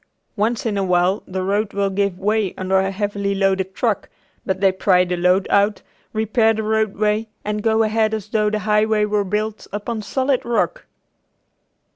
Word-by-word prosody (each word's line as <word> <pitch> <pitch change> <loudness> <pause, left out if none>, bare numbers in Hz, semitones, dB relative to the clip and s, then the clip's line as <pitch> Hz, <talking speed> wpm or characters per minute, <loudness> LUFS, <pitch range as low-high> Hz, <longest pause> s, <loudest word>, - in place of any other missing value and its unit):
Once 225 +3 0
in 210 -3 0
awhile 180 +1 +2
the 185 0 -3
road 200 +2 -1
will 200 -1 0
give 200 -1 0
way 205 0 0
under 190 +1 +1
a 190 0 0
heavily 200 0 -2
loaded 195 -1 0
truck, 225 -5 -1 0.3
but 190 0 -2
they 195 -1 +4
pry 185 -1 +3
the 180 0 -2
load 180 +2 +2
out, 200 +1 +2 0.3
repair 220 +1 +2
the 220 - -2
roadway, 215 0 0 0.2
and 210 0 -2
go 225 +1 +2
ahead 215 0 +1
as 215 -2 -4
though 215 -1 +1
the 215 - -1
highway 210 0 +2
were 210 -1 0
built 210 +2 -3
upon 215 +2 -4
solid 260 +4 0
rock. 235 -1 -1
210 Hz, 170 wpm, -20 LUFS, 195-220 Hz, 0.3 s, they